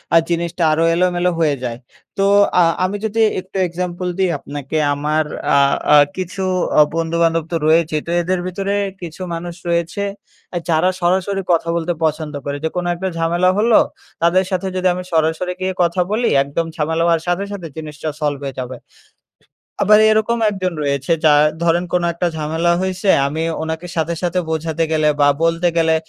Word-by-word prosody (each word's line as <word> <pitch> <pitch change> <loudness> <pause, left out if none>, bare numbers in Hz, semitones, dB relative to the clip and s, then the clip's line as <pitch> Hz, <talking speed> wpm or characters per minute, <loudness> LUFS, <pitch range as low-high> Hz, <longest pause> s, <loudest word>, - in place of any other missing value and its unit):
আ - - +9
জিনিসটা 170 0 -1
আরো 160 +2 +2
এলোমেলো 180 0 +1
হয়ে 155 -3 +2
যায়। 120 -2 -3 0.4
তো 195 - +2 0.4
আ - - +6 0.2
আমি 195 +3 -1
যদি 220 +1 -2 0.2
একটু 185 +1 -8
এক্সাম্পল 180 +1 -4
দিই 190 -1 +2
আপনাকে। 145 +1 -5 0.2
আমার 150 +2 0 0.3
আ - - +5 0.4
আ - - +9 0.2
কিছু 185 +1 -4 0.4
অ - - +9
বন্ধু-বান্ধব 165 0 +1
তো - - -1
রয়েছেই। 155 -1 +2
তো - - -2
এদের 185 +2 -1
ভেতরে 195 +2 -2 0.3
কিছু 170 +1 -8
মানুষ 170 +1 -5
রয়েছে, 170 +3 -1 0.5
এ - - +1
যারা 160 +3 +3
সরাসরি 190 +3 +1
কথা 170 0 0
বলতে 170 +1 -1
পছন্দ 155 -1 -2
করে। 140 0 -3
যেকোনো 175 +2 -2
একটা 190 +2 -3
ঝামেলা 175 +2 +2
হলো 225 +1 +4 0.4
তাদের 180 +3 +3
সাথে 185 +1 -1
যদি 185 0 +1
আমি 180 - -5
সরাসরি 160 +3 +1
গিয়ে 185 0 -1
কথা 170 +2 +1
বলি, 235 +3 +1 0.2
একদম 145 +4 -2
ঝামেলা 160 +1 0
হওয়ার 165 -1 +2
সাথে, 175 +3 0
সাথে 190 -5 -6
জিনিসটা 155 -1 -5
সলভ 145 -2 -1
হয়ে 135 -1 -6
যাবে। 125 0 -6 1.0
আবার 210 +1 +6
এরকম 220 +2 +1
একজন 185 -3 -3
রয়েছে, 140 +2 -1
যার 150 -1 +6 0.2
ধরেন 170 +1 +2
কোন 180 - +2
একটা 170 +1 -1
ঝামেলা 160 +3 0
হইছে। 190 +1 -1 0.2
আমি 155 +3 -3 0.2
ওনাকে 160 +2 -4
সাথে, 160 +1 0
সাথে 175 +1 0
বোঝাতে 160 0 -1
গেলে 155 -1 +2
বা 145 - +6 0.2
বলতে 165 +1 +2
গেলে 160 -1 +3
170 Hz, 175 wpm, -18 LUFS, 160-185 Hz, 1.0 s, আ